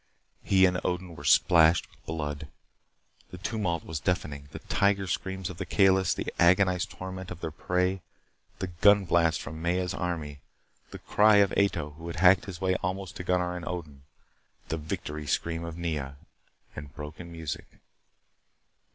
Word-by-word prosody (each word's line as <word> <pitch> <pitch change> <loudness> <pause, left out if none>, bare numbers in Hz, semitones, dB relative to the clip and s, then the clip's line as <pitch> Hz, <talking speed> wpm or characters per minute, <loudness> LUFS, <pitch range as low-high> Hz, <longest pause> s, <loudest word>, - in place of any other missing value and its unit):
He 95 -1 +4
and 90 -1 +1
Odin 90 -1 -3
were 70 - -10
splashed 85 +1 +5
with - - -25
blood. 75 -2 -4 0.8
The 90 - -9
tumult 90 -4 -2
was 80 -1 -4
deafening. 70 -4 -2
The - - -7
tiger 100 -1 +1
screams 95 0 -3
of 85 - -11
the - - -3
Kalis, 95 -2 +3
the - - -4
agonized 90 +1 +4
torment 95 0 -7
of 90 - -7
their 80 -2 -4
prey. 90 +4 -1 0.6
The 95 - -3 0.2
gun 100 -1 +6
blasts 85 -2 +2
from 80 0 -7
Maya's 90 +2 0
army, 80 -5 -4 0.5
the - - -8
cry 105 0 +4
of 100 -2 +5
Ato 85 -7 +1
who 80 +3 -10
had 85 - -5
hacked 95 0 +5
his 90 -4 -7
way 95 0 +1
almost 95 0 -4
to 90 - -5
Gunnar 90 0 0
and 90 - -6
Odin, 75 -6 -6 0.7
the 80 - -1
victory 75 -1 -5
scream 85 +3 -1
of 85 0 -6
Nea, 75 -5 -3 0.6
the - - -6
broken 75 +4 -9
music! 80 -4 -5
90 Hz, 160 wpm, -28 LUFS, 80-95 Hz, 0.8 s, gun